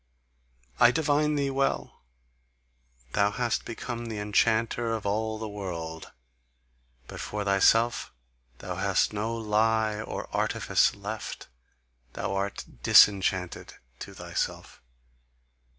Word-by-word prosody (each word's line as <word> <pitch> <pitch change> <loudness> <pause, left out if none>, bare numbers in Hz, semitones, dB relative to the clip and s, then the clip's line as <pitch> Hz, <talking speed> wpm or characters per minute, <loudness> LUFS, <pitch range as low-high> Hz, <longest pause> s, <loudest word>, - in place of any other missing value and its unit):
I 120 - +8
divine 150 +1 +1
thee 140 -1 0
well: 135 0 -1 1.1
thou 100 +6 +2
hast 115 +2 -1
become 120 +1 -5
the 110 -2 -5
enchanter 115 +2 +1
of 110 - -6
all 110 +2 -1
the 110 0 -5
world; 85 -6 -6 0.9
but - - -9
for 105 -1 -4
thyself 115 +4 +3 0.5
thou 90 +3 -6
hast 95 +1 +1
no 110 +2 -2
lie 110 0 +1
or - - -5
artifice - - +2
left, 105 +1 -6 0.6
thou 95 - -3
art 100 0 -3 0.2
disenchanted 95 -1 +4 0.2
to - - -9
thyself! - - -4
110 Hz, 105 wpm, -27 LUFS, 100-115 Hz, 1.1 s, I